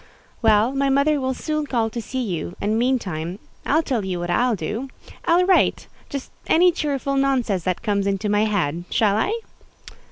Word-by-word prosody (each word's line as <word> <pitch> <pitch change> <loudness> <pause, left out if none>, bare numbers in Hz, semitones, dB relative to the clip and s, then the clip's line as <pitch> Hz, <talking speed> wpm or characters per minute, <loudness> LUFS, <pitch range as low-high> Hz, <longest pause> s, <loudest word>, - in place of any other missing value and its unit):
"Well, 220 +2 +4
my 275 0 +1
mother 280 +2 +2
will 260 0 -1
soon 305 +1 -2
call 230 -4 0
to 235 - -4
see 255 +4 -3
you; 175 -4 -4
and, 215 +2 0
meantime, 190 -9 -1 0.3
I'll 315 +3 +3
tell 250 -8 -1
you 185 -2 -2
what 175 0 -3
I'll 245 +5 +2
do. 210 +10 -4 0.4
I'll 355 +1 +4
write—just 285 -6 0 0.2
any 355 +2 +5
cheerful 280 -4 -2
nonsense 250 -9 +1
that 185 -2 -1
comes 200 -3 0
into 200 +1 -1
my 210 +1 +2
head—shall 195 +2 0
I?" 220 - +1
230 Hz, 165 wpm, -22 LUFS, 200-275 Hz, 0.4 s, any